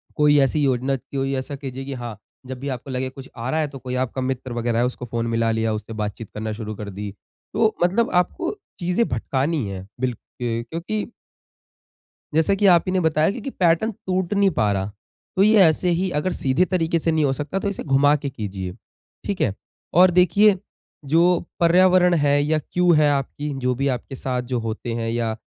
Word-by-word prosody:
कोई 150 0 +4
ऐसी 140 +2 +2
योजना 130 0 +1
कोई 135 +1 -3
ऐसा 130 +2 -4
कीजिए 135 -1 -6
कि 140 - -5
हाँ, 120 -4 -6 0.3
जब 130 -1 -7
भी 140 - -5
आपको 130 +1 -5
लगे 130 0 -2
कुछ 135 0 -11
आ 120 +3 -4
रहा 160 - 0
है 155 - +1
तो 140 -1 -10
कोई 125 0 -5
आपका 130 +1 -2
मित्र 130 -1 -3
वगैरह 120 -1 0
है 120 - +3
उसको 125 0 -4
फ़ोन 115 0 -2
मिला 115 0 +1
लिया 110 0 0
उससे 105 +1 -5
बातचीत 105 0 -5
करना 110 +1 -4
शुरू 110 -1 -6
कर 105 0 -6
दी। 100 +1 -6 0.4
तो 220 -1 +2
मतलब 195 +6 +2
आपको 340 - 0 0.2
चीज़ें 180 +6 +1
भटकानी 135 +4 -1
है 95 0 -7
बिल्क 125 -3 -1 0.2
क्योंकि 125 - -3 1.3
जैसा 160 +5 +3
कि 200 - 0
आप 170 - +2
ही - - 0
ने 185 - +2
बताया 160 0 +2
कि 235 +3 -7
कि, 275 - -4
पैटर्न 180 +2 +2
टूट 185 -2 -2
नहीं 200 -1 +4
पा 110 -9 +1
रहा। 95 +1 -2 0.4
तो 190 - +4
ये 215 +1 +5
ऐसे 165 +2 +3
ही 190 +1 0
अगर 185 +5 -1
सीधे 135 +7 +1
तरीके 170 -3 0
से 165 - 0
नहीं 155 -2 +2
हो 135 - +2
सकता, 150 +8 -3
तो 200 - -1
इसे 200 - -5
घुमा 145 +1 +4
के 145 -1 -3
कीजिए। 100 -7 -5 0.5
ठीक 200 -2 -2
है? 100 - +2 0.4
और 180 +2 +6
देखिए, 185 +3 +5 0.5
जो 170 +5 +4 0.2
पर्यावरण 180 +1 +5
है 145 0 +3
या 155 +1 +1
क्यू 180 +4 +1
है 150 -2 +4
आपकी, 145 +2 -2
जो 125 0 0
भी 140 +3 0
आपके 135 - -8
साथ 125 -1 -2
जो 120 - +1
होते 115 +1 -4
हैं, 115 0 -2
या 115 -1 -1
140 Hz, 205 wpm, -22 LUFS, 120-175 Hz, 1.3 s, और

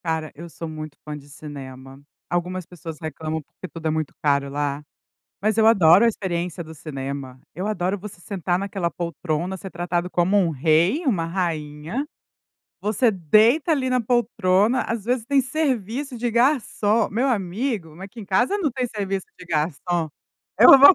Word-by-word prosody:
Cara, 160 -2 -2
eu 170 +3 -9
sou 165 0 -7
muito 155 -2 -7
fã 150 -1 -5
de 145 -1 -12
cinema. 135 -2 -10 0.3
Algumas 180 +1 -2
pessoas 165 -2 -9
reclamam, 160 -1 -4
porque 185 - -11
tudo 165 -2 -10
é - - +2
muito 155 -2 -2
caro 140 -1 +2
lá. 145 0 -2 0.6
Mas 215 +1 +1
eu 220 - +5
adoro 190 -3 +7
a - - +6
experiência 180 -4 -3
do 160 -1 -8
cinema. 140 -4 -6 0.2
Eu 185 +5 -2
adoro 195 -2 0
você 190 -2 -10
sentar 180 -1 -1
naquela 195 -3 -2
poltrona, 170 +1 -3
ser 190 +1 -8
tratado 175 0 -2
como 180 +3 +2
um 185 -4 +3
rei, 165 - +2
uma 195 - +1
rainha. 165 - -2 0.8
Você 215 +4 +2
deita 215 - +4
ali 275 -5 +2
na 255 0 +2
poltrona, 225 -2 +2
às 225 -3 -3
vezes 245 0 0
tem 280 +1 +4
serviço 260 -2 -1
de 240 +1 0
garçom. 230 -4 +2
Meu 245 +6 0
amigo, 195 - -2
aqui 195 +5 -10
em - - -7
casa 245 - +2
não 325 -8 +1
tem 255 0 -1
serviço 195 -4 -3
de 180 - -10
garçom, 165 +1 -1 0.5
eu - - +11
vou 285 +6 +10
180 Hz, 170 wpm, -23 LUFS, 160-225 Hz, 0.8 s, eu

